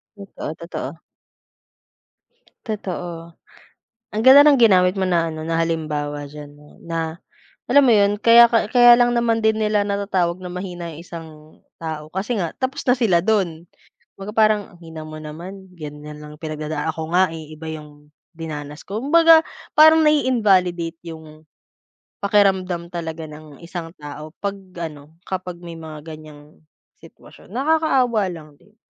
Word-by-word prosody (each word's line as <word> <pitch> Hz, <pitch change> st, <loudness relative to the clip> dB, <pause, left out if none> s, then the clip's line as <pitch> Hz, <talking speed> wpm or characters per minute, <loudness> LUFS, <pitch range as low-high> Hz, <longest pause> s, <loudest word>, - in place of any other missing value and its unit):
Totoo, 200 Hz, -6 st, -7 dB
totoo. 170 Hz, 0 st, -7 dB, 1.7 s
Totoo. 175 Hz, -5 st, -6 dB, 0.8 s
Ang 215 Hz, -, 0 dB
ganda 280 Hz, +3 st, +9 dB
ng 290 Hz, -, +7 dB
ginamit 185 Hz, -4 st, +5 dB
mo 190 Hz, -, -1 dB
na 170 Hz, -3 st, +1 dB
ano, 155 Hz, -1 st, -6 dB
na 165 Hz, +1 st, -1 dB
halimbawa 150 Hz, -3 st, -2 dB
diyan 145 Hz, 0 st, -10 dB
no, 150 Hz, 0 st, -19 dB
na 165 Hz, 0 st, -4 dB, 0.5 s
alam 285 Hz, 0 st, +6 dB
mo 240 Hz, -, +5 dB
yun 205 Hz, 0 st, +3 dB
kaya 235 Hz, +2 st, +7 dB
ka 230 Hz, -3 st, +2 dB
kaya 240 Hz, 0 st, +7 dB
lang 240 Hz, 0 st, +3 dB
naman 230 Hz, -1 st, +1 dB
din 220 Hz, 0 st, +2 dB
nila 210 Hz, -1 st, +1 dB
natatawag 195 Hz, -4 st, -1 dB
na 180 Hz, -, -6 dB
mahina 175 Hz, -2 st, -6 dB
yung 155 Hz, -, -10 dB
isang 170 Hz, -1 st, -9 dB, 0.5 s
tao 155 Hz, -1 st, -6 dB
kasi 195 Hz, +6 st, -2 dB
nga 170 Hz, -5 st, -2 dB
tapos 260 Hz, +1 st, -3 dB
na 250 Hz, 0 st, +2 dB
sila 185 Hz, -8 st, +3 dB
dun. 175 Hz, -6 st, -1 dB, 0.4 s
Kumbaga 195 Hz, +2 st, -8 dB
parang, 215 Hz, -1 st, +3 dB, 0.2 s
"Ang -, -, -26 dB
hina 160 Hz, -2 st, -10 dB
mo 155 Hz, 0 st, -9 dB
naman, 180 Hz, +5 st, -10 dB
yan 150 Hz, -2 st, -8 dB
na 150 Hz, -, -8 dB
lang 150 Hz, 0 st, -12 dB
pinagdadaa 155 Hz, -1 st, -4 dB
ako 160 Hz, +1 st, -6 dB
nga, 185 Hz, +1 st, +4 dB
eh, 155 Hz, -1 st, -9 dB
iba 155 Hz, +1 st, -9 dB
yung 150 Hz, -1 st, -10 dB, 0.2 s
dinanas 150 Hz, -3 st, -8 dB
ko". 210 Hz, +3 st, -4 dB
Kumbaga 330 Hz, +2 st, +6 dB, 0.3 s
parang 315 Hz, +1 st, +7 dB
na-i-invalidate 195 Hz, -, +2 dB, 0.2 s
yung 155 Hz, -1 st, -13 dB, 0.8 s
pakiramdam 190 Hz, -4 st, +1 dB
talaga 165 Hz, -1 st, -5 dB
ng 150 Hz, -1 st, -12 dB
isang 170 Hz, 0 st, -7 dB
tao 150 Hz, +1 st, -9 dB
pag 200 Hz, 0 st, -1 dB, 0.2 s
ano, 155 Hz, -2 st, -8 dB
kapag 185 Hz, -2 st, -5 dB
may 170 Hz, -, -8 dB
mga 155 Hz, -2 st, -9 dB
ganyang 155 Hz, -1 st, -12 dB, 0.4 s
sitwasyon. -, -, -17 dB
Nakakaawa 270 Hz, -5 st, +1 dB
lang 160 Hz, -4 st, -9 dB
din 210 Hz, +1 st, -25 dB
175 Hz, 150 wpm, -21 LUFS, 155-210 Hz, 1.7 s, ganda